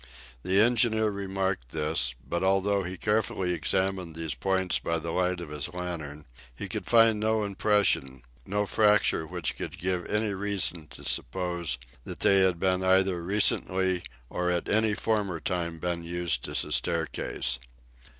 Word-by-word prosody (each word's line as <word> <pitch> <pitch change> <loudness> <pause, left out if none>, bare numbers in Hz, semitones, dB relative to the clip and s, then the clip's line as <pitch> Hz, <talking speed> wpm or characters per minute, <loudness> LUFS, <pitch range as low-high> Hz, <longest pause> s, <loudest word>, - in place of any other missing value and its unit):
The 95 +7 +3
engineer 110 -1 +3
remarked 95 -7 -2
this; 75 -5 0
but 85 - -2
although 95 +1 +2
he 90 0 -5
carefully 100 -3 0
examined 95 0 -1
these 80 -3 -3
points 95 +7 0
by 85 0 -1
the 80 +1 -4
light 90 +1 0
of 85 -3 -8
his 75 +3 -4
lantern, 80 -5 -5 0.3
he - - -5
could - - -5
find 115 -2 +5
no 110 0 +1
impression, 100 - +1 0.2
no 105 +8 -1
fracture 105 -6 +3
which 90 -2 -3
could - - -6
give 90 0 -2
any 105 -1 0
reason 95 -5 -1
to - - -12
suppose 85 -1 -1 0.3
that - - -8
they 100 - +6
had 95 -2 +2
either 95 -1 +3
recently 95 -1 +2 0.3
or 90 +7 -2
at 90 -1 -1
any 110 0 +2
former 100 -7 -1
time 85 -2 -3
been 85 +1 -3
used 85 -6 -2
as - - +1
a - - -9
staircase. 80 -6 -1
90 Hz, 150 wpm, -28 LUFS, 85-100 Hz, 0.3 s, they